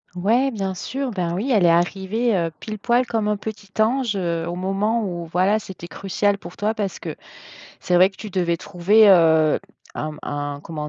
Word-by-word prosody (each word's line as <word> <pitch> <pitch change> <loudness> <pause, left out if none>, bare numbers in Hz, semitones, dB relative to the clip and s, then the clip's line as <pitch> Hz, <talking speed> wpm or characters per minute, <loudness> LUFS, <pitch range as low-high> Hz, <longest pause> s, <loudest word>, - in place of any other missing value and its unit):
Ouais, 230 +9 +2
bien 195 -4 -3
sûr, 265 +8 -4
ben, 180 -6 -2
oui 210 +10 -2
elle 210 -7 +4
est - - +6
arrivée, 195 +7 +1
heu, 165 -1 -1
pile 215 -1 -6
poil, 240 +4 +2
comme 220 -2 -1
un 210 - +1
petit 205 -1 -8
ange, 240 -1 +1
heu, 170 -3 -1
au 170 - -3
moment 195 +5 0
où 175 -4 -4
voilà 185 +5 +2
c'était 190 -5 -9
crucial 200 +2 -1
pour 175 -1 -11
toi 215 +2 -1
parce 205 -3 -3
que, - - -6 0.7
c'est 180 - -1
vrai 185 +2 +6
que 195 - -22
tu 215 - -8
devais 175 -3 0
trouver, 200 +5 +4
heu, 160 -4 +5 0.4
un 155 0 -4
un 145 0 -4
comment 150 -2 -5
195 Hz, 200 wpm, -22 LUFS, 175-215 Hz, 0.7 s, est